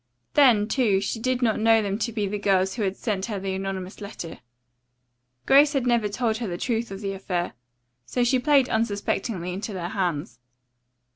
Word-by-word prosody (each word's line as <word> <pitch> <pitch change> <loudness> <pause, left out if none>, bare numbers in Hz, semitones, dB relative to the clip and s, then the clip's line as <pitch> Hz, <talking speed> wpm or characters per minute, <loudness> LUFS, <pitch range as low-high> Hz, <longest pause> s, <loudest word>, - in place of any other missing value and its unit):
Then, 240 -8 +5
too, 220 -7 +2
she 200 +3 -3
did 255 +1 0
not 220 -2 +2
know 225 0 +5
them 200 +1 -2
to 235 - -1
be 215 -2 -1
the 205 +1 -3
girls 190 -1 +2
who 235 - -4
had 195 -2 -1
sent 200 -3 -2
her 210 -4 -3
the 190 0 -3
anonymous 190 0 -5
letter. 200 -5 -7 1.1
Grace 285 +2 +6
had 270 -3 0
never 235 -4 +2
told 220 +1 -1
her 230 -1 -4
the 175 -2 -4
truth 235 +1 -1
of 195 +1 -7
the 195 -1 -3
affair, 180 -2 -3 0.5
so 245 - 0
she 250 +2 +3
played 275 -1 +4
unsuspectingly 205 -4 -1
into 205 +3 -5
their 175 -2 -4
hands. 165 - -2
210 Hz, 190 wpm, -25 LUFS, 190-235 Hz, 1.1 s, Grace